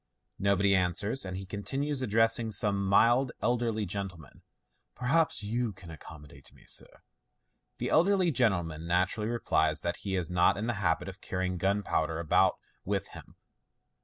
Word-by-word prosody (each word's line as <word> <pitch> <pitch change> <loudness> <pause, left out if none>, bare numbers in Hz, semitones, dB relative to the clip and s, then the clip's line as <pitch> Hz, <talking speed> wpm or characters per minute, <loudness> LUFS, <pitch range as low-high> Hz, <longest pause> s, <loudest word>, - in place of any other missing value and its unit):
" - - -47
Nobody 100 0 +3
answers, 95 +7 0
and 95 0 -5
he 95 - -6
continues, 135 +9 -3
addressing 115 0 +3
some 100 -2 +1
mild 120 +6 +3
elderly 115 -3 0
gentleman, 90 -6 -7 0.3
" - - -43
Perhaps 140 -1 +1
you 115 +1 -2
can 90 -3 -12
accommodate 75 -3 -13
me, - - -20
sir? - - -6 0.3
" - - -50
The - - -3
elderly 185 +1 +3
gentleman 85 - 0
naturally 95 +5 0
replies 80 -10 +1
that 85 0 -2
he 95 -2 -3
is 90 -3 -1
not 90 +1 +3
in 105 - -3
the 120 - 0
habit 85 -1 0
of 95 -1 -9
carrying 90 -1 -3
gunpowder 95 -5 0
about 85 -2 +3 0.3
with - - -2
him. - - -13
100 Hz, 160 wpm, -29 LUFS, 90-115 Hz, 0.3 s, Nobody